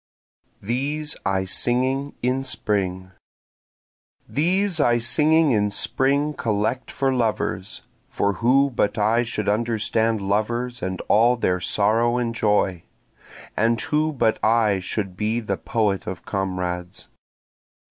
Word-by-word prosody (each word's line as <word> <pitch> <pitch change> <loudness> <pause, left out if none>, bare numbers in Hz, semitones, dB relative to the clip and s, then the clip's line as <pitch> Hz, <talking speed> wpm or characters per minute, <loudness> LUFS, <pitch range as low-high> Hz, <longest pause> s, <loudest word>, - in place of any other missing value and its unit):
These 145 +7 -2
I 95 -1 0
Singing 130 +7 0
in 130 +2 0
Spring 95 -7 -2 1.2
These 180 +4 +1
I 120 -5 +3
singing 155 +5 +3
in 105 -3 +2
spring 140 +8 +1
collect 115 +1 -2
for 135 -1 0
lovers, 110 -5 -2 0.3
(For 100 0 0
who 135 +4 +3
but 110 -3 0
I 110 +3 +2
should 115 -3 -3
understand 110 +1 0
lovers 120 +5 -2
and 95 -1 -3
all 120 +3 +3
their 90 -6 0
sorrow 115 +6 +1
and 120 -2 -1
joy? 105 -5 +1 0.7
And 115 +1 +1
who 155 +1 0
but 115 -6 0
I 110 -3 +3
should 95 +1 -4
be 110 +4 -1
the 115 - -3
poet 105 -4 -1
of 95 - -6
comrades?) 90 -2 -4
115 Hz, 120 wpm, -23 LUFS, 100-130 Hz, 1.2 s, I